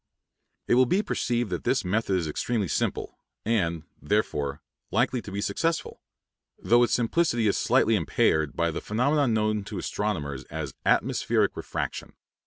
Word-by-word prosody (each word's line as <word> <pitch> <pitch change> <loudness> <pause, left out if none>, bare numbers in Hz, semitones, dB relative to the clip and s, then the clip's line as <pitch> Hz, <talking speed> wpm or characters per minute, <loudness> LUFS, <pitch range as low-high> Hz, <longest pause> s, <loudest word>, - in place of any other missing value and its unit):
It - - +2
will 125 +1 +5
be 195 - +2
perceived 120 - -1
that - - -3
this - - +1
method 100 +1 0
is 85 -3 -2
extremely 105 +6 -1
simple, - - -2 0.3
and, 85 -8 0 0.2
therefore, 75 -4 -1 0.3
likely 125 -1 +1
to 100 - -9
be 100 +1 -3
successful; 165 +9 -1 0.6
though 120 +1 +3
its 120 - +2
simplicity 120 -1 +1
is 100 - +2
slightly 115 -2 +3
impaired 80 -3 +1
by 85 0 +1
the 80 - -4
phenomenon 135 +4 +1
known 110 -1 0
to 100 -1 -6
astronomers 80 -9 -3
as - - -5
"atmospheric - - +2
refraction." - - -4
105 Hz, 150 wpm, -26 LUFS, 85-120 Hz, 0.6 s, will